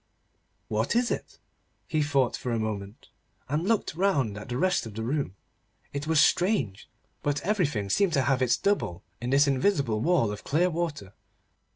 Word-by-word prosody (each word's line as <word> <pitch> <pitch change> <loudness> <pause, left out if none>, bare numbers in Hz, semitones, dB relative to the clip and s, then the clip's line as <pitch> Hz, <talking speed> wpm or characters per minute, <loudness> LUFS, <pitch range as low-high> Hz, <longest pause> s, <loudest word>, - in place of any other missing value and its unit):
What 110 - 0
is 240 0 +2
it? - - -4 0.5
He 155 -3 0
thought 140 -4 +1
for 125 - -4
a 115 - +1
moment, 105 -2 -5 0.4
and 150 +6 -1
looked 225 -7 +1
round 150 - +1
at 105 +2 -8
the 120 - -2
rest 180 -5 +1
of 105 - -10
the 110 - -3
room. 130 -5 -2 0.6
It 140 +2 -4
was 160 -1 +3
strange, 175 - +2 0.3
but 145 -1 0
everything 155 - 0
seemed 195 - +2
to 140 -4 +3
have 130 +1 +1
its 125 -2 +3
double 200 - -1 0.2
in 120 - -3
this 140 +2 +5
invisible 135 - +1
wall 160 -10 +2
of 105 - -7
clear 175 +5 +2
water. 155 - -3
140 Hz, 175 wpm, -27 LUFS, 110-175 Hz, 0.6 s, this